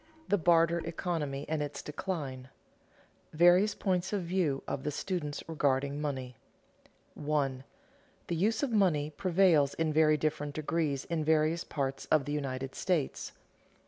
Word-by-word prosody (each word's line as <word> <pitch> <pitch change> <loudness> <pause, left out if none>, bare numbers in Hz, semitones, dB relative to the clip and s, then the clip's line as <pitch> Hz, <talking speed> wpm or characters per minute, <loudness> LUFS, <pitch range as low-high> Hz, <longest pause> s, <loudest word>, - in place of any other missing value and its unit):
THE 205 - +3
BARTER 170 0 +4
ECONOMY 160 -5 -3
AND 155 -1 -1
ITS 145 -1 -4
DECLINE 145 -5 -4
[Sidenote: - - -34
Various 175 +6 +5
points 180 -2 -1
of 200 -3 -1
view 170 -6 0
of 135 - -3
the 150 - -2
students 150 -1 -3
regarding 140 -2 0
money] 130 -5 -4 0.8
1. 145 -3 -1 0.6
_The 170 - -1
use 215 - +1
of 275 - 0
money 165 -9 +2
prevails 170 -4 +3
in 160 -1 0
very 155 0 +4
different 145 -1 -2
degrees 155 -3 -1
in 165 -2 -2
various 160 +2 +2
parts 135 -2 -3
of 155 -3 +3
the 145 - -3
United 135 -2 -3
States. 170 -7 -1
155 Hz, 145 wpm, -31 LUFS, 140-170 Hz, 0.8 s, Various